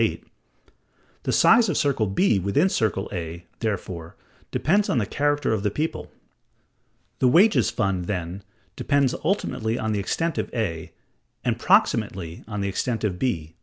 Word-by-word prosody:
VIII). - - 0 1.0
The - - +1
size 230 -2 +5
of 160 - 0
circle 135 -7 +1
B 100 - +2
within 100 - +2
circle 100 - 0
A, 85 -1 -5
therefore, 90 -6 -4 0.3
depends 200 +6 +1
on - - +1
the 110 - +1
character 145 +1 0
of 110 - -1
the 105 - +1
people. 155 +10 -3 1.1
The 130 - +4
wages 190 - +5
fund, 100 -6 -1
then, 90 0 -4 0.3
depends 140 -2 +1
ultimately 120 - -1
on 110 -2 -2
the 105 - 0
extent 165 +11 -1
of - - -3
A, 85 -9 -3 0.5
and - - 0
proximately 85 -3 +1
on 105 -2 -4
the 100 - -1
extent 115 +4 -2
of 95 -4 -1
B. 85 -11 -2
110 Hz, 155 wpm, -24 LUFS, 95-145 Hz, 1.1 s, size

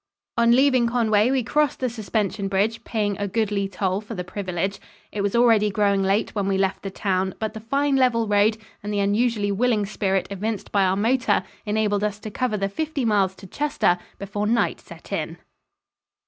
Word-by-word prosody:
On 235 0 +4
leaving 260 -2 +4
Conway 225 -2 +2
we 265 -1 +1
crossed 300 +5 +1
the 255 - 0
suspension 215 -3 -2
bridge, 205 +4 0
paying 210 -3 -1
a 205 - -1
goodly 200 -1 0
toll 190 0 -1
for 220 +1 -8
the 180 - -3
privilege. 190 +1 -3 0.3
It 205 - -3
was 200 +2 0
already 225 -3 +4
growing 200 -1 +2
late 195 +2 +1
when 200 -2 -1
we 195 -1 +1
left 195 0 0
the 195 - -4
town, 190 -1 -1
but 220 -1 -3
the 220 - -6
fine 275 +5 +1
level 235 -4 +2
road 205 +1 +3 0.2
and 205 - -5
the 205 - -1
unusually 205 +1 +1
willing 215 0 +1
spirit 195 -2 0
evinced 210 +2 -4
by 200 -2 +3
our 185 0 +2
motor 240 +4 +2 0.2
enabled 210 -1 +1
us 210 -1 -1
to 215 - -6
cover 240 -1 -1
the 195 -1 0
fifty 295 +5 -2
miles 200 -4 +2
to 195 - -13
Chester 290 -7 0 0.2
before 205 +1 -3
night 230 +1 +1
set - - -14
in. - - -3
210 Hz, 190 wpm, -23 LUFS, 195-230 Hz, 0.3 s, On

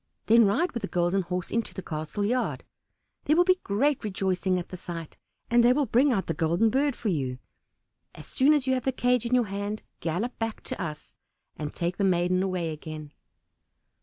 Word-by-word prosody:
Then 230 +1 +6
ride 295 - +1
with 235 - -4
the 200 - -3
Golden 175 +2 +1
Horse 180 0 -4
into 225 -5 -2
the 190 - -5
castle 155 +6 -3
yard; 245 +4 -1 0.6
there 305 - +4
will 350 - +6
be 370 0 +3
great 260 +8 +1
rejoicing 190 -2 0
at 175 - -5
the - - -7
sight, 170 -3 -7 0.3
and 240 0 +4
they 245 +1 +6
will 290 +1 +1
bring 260 +5 +3
out 195 -6 0
the 165 - -1
Golden 170 +8 +2
Bird 275 +1 +1
for 220 - -2
you. 130 -7 -1 0.8
As - - -10
soon 290 +3 +3
as 285 -3 0
you 260 - +2
have 255 -2 -1
the 265 - +2
cage 245 -2 +1
in 250 - +2
your 245 -2 +3
hand 205 +2 -4 0.2
gallop 180 +10 -3
back 225 -1 -3
to - - -5
us, 155 -3 -6 0.4
and 150 -1 -5
take 175 +1 -3
the 200 - 0
maiden 185 -1 +2
away 180 -4 -1
again." 155 -1 -8
200 Hz, 205 wpm, -27 LUFS, 175-245 Hz, 0.8 s, Then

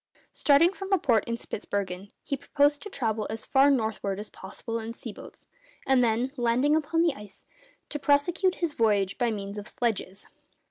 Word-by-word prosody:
Starting 310 +6 +4
from 390 0 -7
a 390 - +5
port 235 - +2
in 235 0 -2
Spitzbergen, 200 -3 -4
he 280 - -2
proposed 285 +1 +1
to 415 - -7
travel 220 - -2
as 220 0 -4
far 270 +1 +5
northward 220 -6 0
as 210 - -7
possible 225 +4 -6
in 225 +1 -6
sea - - -7
boats, - - -13 0.4
and 265 -2 +4
then, 235 +3 +1
landing 250 +5 +2
upon 315 +2 +1
the 335 -4 +2
ice, 210 -5 -12 0.4
to 295 - -4
prosecute 335 +7 +2
his 340 -4 -2
voyage 205 -5 +1
by 240 -1 +2
means 200 -1 -4
of 205 - -9
sledges. 210 -4 -2
235 Hz, 180 wpm, -27 LUFS, 210-290 Hz, 0.4 s, a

